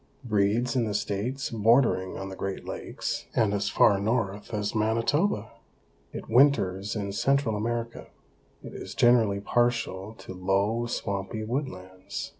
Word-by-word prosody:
Breeds 110 +2 +1
in 120 -3 +2
the 105 -2 -2
states 115 +7 -2
bordering 115 -4 +3
on 95 0 -5
the 95 - -7
Great 95 0 -4
Lakes - - -4
and 105 -3 +2
as 100 0 0
far 100 -1 +4
north 105 -1 -1
as 105 -2 -2
Manitoba. 115 - +1 0.6
It - - -7
winters 110 -6 +3
in 100 -2 -3
Central 135 +2 +1
America. 115 +2 -3 0.6
It - - -9
is - - -8
generally 115 -5 +4
partial 115 -3 0
to 95 - -10
low, 100 +6 0
swampy 100 -1 -3
woodlands. 100 -7 -5
110 Hz, 135 wpm, -27 LUFS, 100-120 Hz, 0.6 s, far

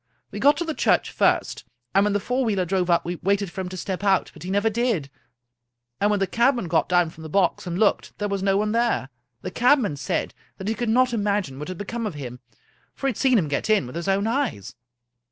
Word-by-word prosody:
We - - -6
got 290 +1 +5
to 345 - -2
the 320 - -2
church - - +1
first, - - +1 0.3
and 195 +1 +5
when 205 0 +1
the 205 - +1
four 250 +6 -1
wheeler 200 -6 0
drove 185 0 0
up 170 - +3
we 175 +1 -3
waited 200 0 0
for 190 - -5
him 180 - -5
to 185 - -7
step 190 +1 -4
out, 195 -2 +2
but 155 - -15
he 180 - -6
never 205 +3 +1
did, 220 - 0 0.9
and 205 - +2
when 205 -1 +1
the 195 - +2
cabman 235 0 +1
got 160 - +1
down 175 -2 +3
from 160 - -14
the 160 - -8
box 185 +1 +1
and 175 0 -3
looked, 210 +1 +1
there 205 - -2
was 200 -1 -2
no 195 0 +2
one 210 +1 0
there! 230 - +1 0.3
The - - -4
cabman 245 - +3
said - - -2 0.2
that 190 - -6
he 220 - +1
could 240 0 -2
not 250 +2 +3
imagine 200 - -1
what 150 - -5
had 185 -1 -6
become 225 +3 -4
of 190 - -6
him, 125 -4 -7 0.6
for - - -6
he 270 - +3
had 230 - -9
seen 260 -3 +3
him 170 -7 +1
get 145 +8 -2
in 215 -9 +3
with 125 - -9
his 170 +2 -4
own 195 +1 +2
eyes. 230 - -2
200 Hz, 250 wpm, -24 LUFS, 175-230 Hz, 0.9 s, got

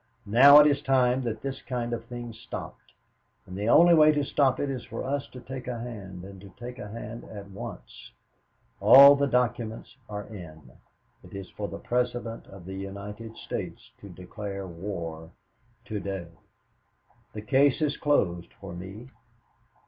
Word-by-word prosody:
Now 135 +7 +8
it 150 - +8
is 145 -1 +3
time 130 -2 +2
that 110 -2 -4
this 135 -1 -4
kind 120 -2 -3
of 115 -1 -4
thing 120 -1 -7
stopped, 110 - -9 0.5
and 95 - -9
the 105 +3 -1
only 175 +5 +7
way 155 -2 +7
to 145 -1 0
stop 135 -2 +2
it 145 - 0
is 130 -3 -4
for - - -6
us 140 +1 -2
to 125 - -11
take 130 +1 -8
a 125 -1 -3
hand, 100 -7 -8
and 95 0 -11
to 100 - -12
take 125 +1 -8
a 120 - -6
hand 115 +2 -8
at 100 -2 -10
once. 95 - -9 0.7
All 140 +2 +10
the 140 0 +1
documents 120 -3 -1
are 105 -1 -5
in. 80 - -11 0.5
It - - -12
is 100 -1 -8
for 105 - -5
the - - -7
President 120 -2 -2
of 95 -3 -13
the 95 - -7
United 100 +3 -7
States - - -6
to 100 - -11
declare 95 +2 -7
war 85 -3 -6 0.6
to 105 0 -4
day. 95 -4 -5 1.0
"The 105 - -7
case 135 +3 +3
is 150 -2 0
closed 90 -12 0
for 100 -3 -8
me. 95 +7 -9
115 Hz, 170 wpm, -27 LUFS, 100-130 Hz, 1.0 s, All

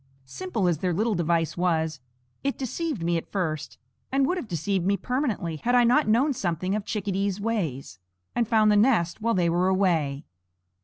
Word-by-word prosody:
Simple 185 - -2
as 170 -4 +1
their 180 0 0
little 220 +4 +1
device 170 -2 0
was, 160 -3 0 0.4
it 275 0 -1
deceived 275 - -3
me 170 0 +1
at 165 - -7
first, 155 - -3 0.3
and 270 0 +3
would 360 - 0
have 355 -10 -5
deceived 180 +1 -1
me 200 +2 +2
permanently 235 - -2
had 245 +10 0
I 245 - +6
not 250 +4 +3
known 255 +7 +3
something 185 -3 -2
of 210 -1 -2
chickadees' 200 -1 -2
ways, 160 - -3 0.3
and 235 -2 0
found 215 -2 +4
the - - +4
nest 210 -5 +2
while 230 +1 +1
they 175 -2 +2
were 175 +2 +2
away. 165 -7 +1
190 Hz, 185 wpm, -26 LUFS, 170-230 Hz, 0.4 s, I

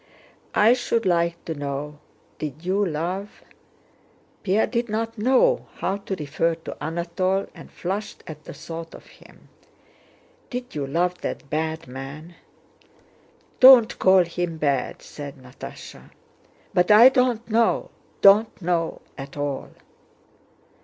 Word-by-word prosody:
"I 220 +3 +6
should 235 -3 -1
like 170 -1 0
to 165 - -3
know, 145 0 -5 0.4
did 155 +2 -6
you 195 +3 +1
love..." 180 +4 -4 1.0
Pierre 205 +3 +2
did 235 -1 -2
not 225 +1 -2
know 265 - +3
how 195 - -2
to 200 -1 -5
refer 160 +1 -1
to 165 - -8
Anatole 180 +4 -1
and - - -13
flushed 195 +4 -5
at 155 -1 -10
the - - -8
thought 165 0 -8
of - - -14
him—"did 250 0 -14
you 145 -2 -3
love 175 +5 -1
that 140 - -5
bad 160 +1 -2
man?" 135 +6 -9 1.3
"Don't 255 -3 +8
call 190 -1 +6
him 170 -1 -3
bad!" 140 -4 -1
said 145 -2 -8
Natásha. 125 -1 -11 0.6
"But 180 0 +2
I 220 +4 +9
don't 250 -3 +1
know, 230 +1 +1 0.3
don't 205 +3 +6
know 170 -2 -1 0.2
at 135 +1 -8
all...." 145 -1 -3
175 Hz, 125 wpm, -24 LUFS, 155-210 Hz, 1.3 s, I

